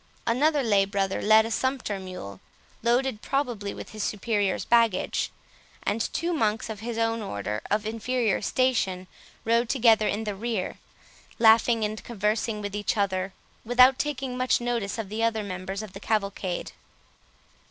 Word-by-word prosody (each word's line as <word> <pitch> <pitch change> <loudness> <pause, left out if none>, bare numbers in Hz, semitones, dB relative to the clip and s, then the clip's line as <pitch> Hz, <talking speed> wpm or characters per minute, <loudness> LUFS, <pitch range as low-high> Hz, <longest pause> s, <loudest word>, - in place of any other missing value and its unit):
Another 285 +5 +2
lay 205 -4 +4
brother 195 -1 -1
led 220 +1 +6
a 225 - -4
sumpter 255 -5 -1
mule, 180 - -8 0.4
loaded 240 -1 +1
probably 240 -8 -2
with - - -8
his 215 - -7
superior's 205 -1 0
baggage; 230 -5 +2 0.5
and 210 +3 0
two 345 +2 -1
monks 220 -6 0
of 215 - -7
his 230 +1 -5
own 225 0 0
order, 105 - -4
of 210 +1 0
inferior 230 0 0
station, 215 -8 0 0.4
rode 230 +1 +2
together 225 -5 +4
in 210 +2 -1
the 210 -1 -3
rear, 215 -1 -3 0.6
laughing 225 0 +5
and 215 +1 -4
conversing 210 0 -1
with 205 0 -4
each 205 +1 -1
other, 190 -1 0 0.3
without 250 +3 +5
taking 270 -3 -2
much 255 0 +2
notice 235 -4 -2
of 225 -3 -4
the 215 +3 -4
other 225 -1 +1
members 190 +1 -5
of 205 -3 -10
the 195 - -8
cavalcade. 200 -4 -2
220 Hz, 150 wpm, -26 LUFS, 200-240 Hz, 0.6 s, led